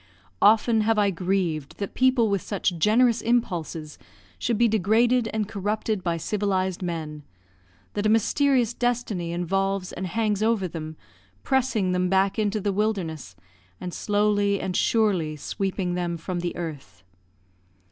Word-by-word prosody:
Often 220 +1 +5
have 220 +1 +2
I 205 -1 +3
grieved 175 -5 -2
that 200 - -5
people 255 -3 +3
with 200 -3 0
such 195 -3 -1
generous 230 +4 +3
impulses 170 -10 -2 0.4
should 235 -2 0
be 235 +1 +4
degraded 225 +4 +2
and 215 -2 -1
corrupted 210 0 -2
by 170 -2 0
civilised 190 +1 -1
men; 160 -4 -4 0.7
that 205 +1 0
a - - +2
mysterious 245 +2 +2
destiny 235 -8 -1
involves 195 +2 -1
and 185 +1 -4
hangs 210 +1 0
over 220 -4 +1
them, 155 -2 -7 0.5
pressing 245 -8 +1
them 180 0 +1
back 195 +3 +2
into 215 0 0
the 200 0 -1
wilderness, 175 - -2 0.4
and 180 -1 -6
slowly 205 -1 +1
and 185 - -3
surely 190 -9 +1
sweeping 190 +3 -3
them 175 -1 -2
from 175 +2 -4
the 175 0 -3
earth. 155 -10 -7
200 Hz, 140 wpm, -25 LUFS, 175-220 Hz, 0.7 s, Often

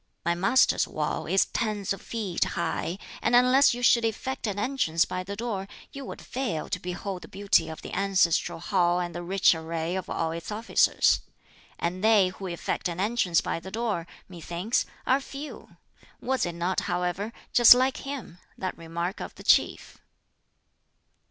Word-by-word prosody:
My 170 - +2
Master's 195 +9 +3
wall - - -3
is 190 - +3
tens 205 -3 -2
of 195 - -9
feet 210 -7 -2
high, 170 +1 -2 0.2
and 240 - +2
unless 255 +1 +5
you 245 - -6
should 235 -1 +5
effect 230 +3 -2
an 205 -1 -3
entrance 205 -9 +1
by 185 - -4
the 200 +2 -6
door, 205 -3 -4 0.2
you 275 - -8
would - - -8
fail 235 - -3
to 180 - -2
behold 180 +1 -5
the - - -10
beauty 195 -4 +1
of 160 - -8
the - - -8
ancestral 190 -4 +2
hall 175 0 +1
and 175 -1 -3
the 175 - -5
rich 190 +2 +3
array 165 +1 -3
of 190 - -4
all 165 -1 -1
its 165 +4 -6
officers. 220 +2 +3 0.6
And 180 +3 -3
they 215 -4 +5
who 190 +1 -8
effect 170 0 -3
an 170 0 -5
entrance 200 -4 +2
by - - -3
the 190 - -9
door, 215 -6 -2 0.2
methinks, 175 +5 -2 0.2
are 265 +2 +3
few! 285 +2 -9 0.4
Was 260 -6 0
it 170 - -5
not, 175 +2 0
however, 180 +4 -1 0.2
just 240 0 +9
like 260 +1 +1
him 275 -11 -7 0.2
that 185 - -3
remark 170 +3 -4
of - - -7
the - - -12
Chief?" - - +2
190 Hz, 170 wpm, -27 LUFS, 175-230 Hz, 0.6 s, just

